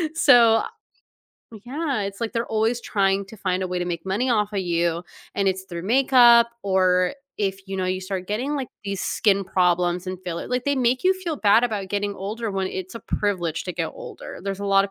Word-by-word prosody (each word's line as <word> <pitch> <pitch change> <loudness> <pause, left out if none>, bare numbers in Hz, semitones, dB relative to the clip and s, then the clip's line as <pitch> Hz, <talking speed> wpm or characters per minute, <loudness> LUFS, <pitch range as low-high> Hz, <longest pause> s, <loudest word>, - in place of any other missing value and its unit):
so 240 -7 +6 1.0
yeah, 275 -3 -2
it's 200 +1 -5
like 230 0 -2
they're 230 0 -1
always 225 +2 0
trying 195 -2 +1
to 220 - -12
find 185 -2 -1
a 185 - -2
way 180 0 -2
to 175 - -1
make 170 -2 -4
money 215 +7 0
off 210 -2 +1
a 200 - -1
you, 170 -2 0 0.3
and 200 -1 +1
it's 190 0 -1
through 170 -2 -7
makeup, 240 -1 +6 0.2
or 185 -2 +2 0.2
if, 195 -1 -1
you 195 - -4
know, 185 - -1
you 185 0 -1
start 185 -1 -4
getting, 255 +8 -2
like, 265 -3 -3 0.2
these 195 -1 -3
skin 200 -2 +1
problems 180 -1 +1
and 185 0 -4
feel 170 -2 -3
it - - -7
like, 250 0 -1
they 285 0 +1
make 250 +2 +1
you 375 +1 +5
feel 355 -4 -4
bad 220 0 +4
about 210 -5 -3
getting 205 0 -2
older 215 +3 -4
when 195 -1 -1
it's 190 +3 -6
a - - -8
privilege 175 -7 -2
to 180 - -4
get 165 -1 -2
older, - - -10
there's 195 -1 -3
a 200 - -3
lotta 195 0 +3
200 Hz, 215 wpm, -23 LUFS, 185-235 Hz, 1.0 s, so